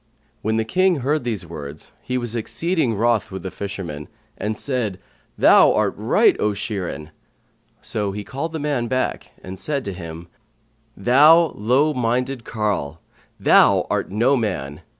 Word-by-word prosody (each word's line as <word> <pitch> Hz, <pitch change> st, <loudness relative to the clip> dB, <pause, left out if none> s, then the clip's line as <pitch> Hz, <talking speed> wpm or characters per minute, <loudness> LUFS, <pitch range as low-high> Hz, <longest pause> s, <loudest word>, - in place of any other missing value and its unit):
When 110 Hz, +1 st, 0 dB
the 110 Hz, -, 0 dB
King 180 Hz, +3 st, +2 dB
heard 145 Hz, +3 st, 0 dB
these 110 Hz, -7 st, -3 dB
words, 75 Hz, -3 st, -9 dB
he 125 Hz, -, -3 dB
was 120 Hz, -2 st, -4 dB
exceeding 155 Hz, +2 st, -1 dB
wroth 115 Hz, +1 st, +1 dB
with 95 Hz, 0 st, -7 dB
the 95 Hz, -, -5 dB
fisherman 95 Hz, -7 st, -6 dB, 0.3 s
and 105 Hz, +1 st, -3 dB
said, 120 Hz, -9 st, -2 dB, 0.4 s
"Thou -, -, +6 dB
art -, -, +1 dB
right, -, -, +3 dB
O 105 Hz, -, +1 dB
Shirin!" 90 Hz, -7 st, -4 dB, 0.7 s
So 105 Hz, -2 st, -2 dB
he 105 Hz, +1 st, -5 dB
called 140 Hz, +6 st, -5 dB
the 160 Hz, -, -4 dB
man 145 Hz, -5 st, -1 dB
back 130 Hz, +2 st, -2 dB
and 95 Hz, 0 st, -8 dB
said 140 Hz, -3 st, -2 dB
to 100 Hz, -, -4 dB
him, 85 Hz, -1 st, -8 dB, 0.7 s
"Thou 150 Hz, -, +5 dB
low 130 Hz, +9 st, +2 dB
minded 125 Hz, 0 st, -1 dB
carle! 100 Hz, -9 st, -2 dB, 0.4 s
Thou -, -, +5 dB
art -, -, -1 dB
no 120 Hz, +7 st, +2 dB
man! 80 Hz, -, -3 dB
110 Hz, 150 wpm, -21 LUFS, 95-130 Hz, 0.7 s, Thou